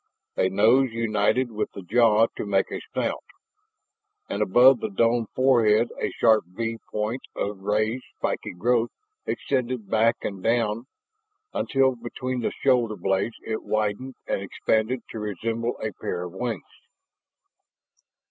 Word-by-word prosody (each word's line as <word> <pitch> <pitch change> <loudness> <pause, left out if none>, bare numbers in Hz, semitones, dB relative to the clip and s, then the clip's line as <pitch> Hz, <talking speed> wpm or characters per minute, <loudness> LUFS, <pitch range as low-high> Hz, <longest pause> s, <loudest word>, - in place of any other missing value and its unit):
A 95 - +2
nose 115 +7 +4
united 115 +2 +1
with 110 -1 -3
the 100 - -8
jaw 115 +2 +4
to - - -4
make 100 -2 +1
a - - -4
snout, - - -2 1.0
and - - -3
above 125 +6 +6
the 220 - -3
domed 115 - +2
forehead 120 -4 +4
a - - 0
sharp 110 -4 +3
V 115 +5 -4
point 110 +5 -2
of 100 -1 -3
raised 110 +5 0
spiky - - -2
growth 120 +5 +1 0.4
extended 125 -5 -2
back 115 +1 +4
and 100 -2 -4
down 115 +2 0 0.7
until 135 -1 +2
behind 125 +1 -4
the - - +1
shoulder 120 -5 +3
blades 95 +4 -1
it 110 0 -2
widened 110 +5 -2
and - - -1
expanded 110 +5 0
to 110 - -5
resemble 115 +3 -2
a 110 -1 -3
pair 90 0 -4
of 90 -1 -7
wings. 115 -1 -3
115 Hz, 140 wpm, -25 LUFS, 105-120 Hz, 1.0 s, above